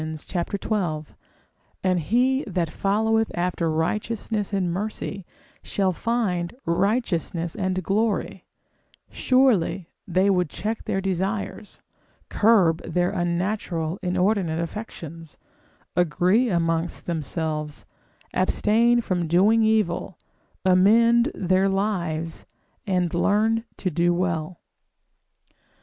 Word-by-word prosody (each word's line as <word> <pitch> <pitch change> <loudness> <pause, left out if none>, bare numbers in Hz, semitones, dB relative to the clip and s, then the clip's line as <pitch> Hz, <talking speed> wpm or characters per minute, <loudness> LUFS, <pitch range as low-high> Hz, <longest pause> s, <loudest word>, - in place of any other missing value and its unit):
xii. 175 -1 -2 0.8
and 185 -1 +2
he 250 - +2
that 175 -4 -1
followeth 220 +2 +1
after 175 -1 -1
righteousness 210 +6 -1
and 185 -4 0
mercy, 200 -1 -4 0.3
shall 195 -2 0
find 190 -4 -1
righteousness 175 -3 0
and 185 -2 -2
glory; 210 +4 -1 0.7
surely 230 -9 +2 0.2
they 185 +2 +2
would 180 -4 +2
check 220 +7 -4
their 195 - -1
desires, 195 +2 -3 0.5
curb 195 -7 +4
in - - -8
their 180 +1 +2
unnatural, 175 -2 -2
inordinate 180 -2 +1
affections, 165 -4 -7 0.6
agree 180 +8 +2
amongst 165 -2 -1
themselves, 155 -2 -3 0.5
abstain 230 +5 +3
from 180 -6 -1
doing 200 +7 +4
evil, 215 -5 +1 0.5
amend 230 +7 +5
their 185 +1 +2
lives, 175 -5 -2 0.4
and 180 -3 0
learn 220 +5 +2
to 185 - -2
do 175 +2 +2
well. 175 -1 -2
185 Hz, 95 wpm, -24 LUFS, 170-215 Hz, 0.8 s, amend